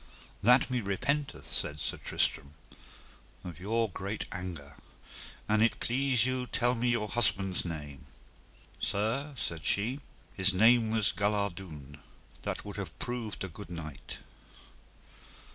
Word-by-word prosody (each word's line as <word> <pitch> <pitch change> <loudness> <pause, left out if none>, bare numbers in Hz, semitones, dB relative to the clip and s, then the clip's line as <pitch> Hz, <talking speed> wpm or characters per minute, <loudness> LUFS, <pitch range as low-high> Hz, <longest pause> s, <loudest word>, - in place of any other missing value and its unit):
That 125 +4 +5
me 125 -1 +1
repenteth, 140 +9 -1
said 75 +1 -2
Sir - - -3
Tristram, 75 -2 -1 0.9
of 85 -2 -8
your 115 +4 +1
great 100 +2 -4
anger; 85 -6 -6 0.7
an 110 0 +3
it 115 - +3
please 130 -1 +2
you 130 -1 -1
tell 120 +1 +2
me 125 0 +1
your 115 -3 +1
husband's 100 -5 +3
name. 75 -4 -6 0.7
Sir, 125 +8 0
said 85 -8 -3
she, 115 - +2 0.3
his 95 0 +4
name 115 +3 +6
was 110 -2 +3
Galardoun, 95 -8 -2 0.4
that - - -4
would - - -6
have - - -6
proved 120 -5 -3
a - - -2
good 85 -1 -10
knight. 80 -5 -6
100 Hz, 125 wpm, -31 LUFS, 85-120 Hz, 0.9 s, name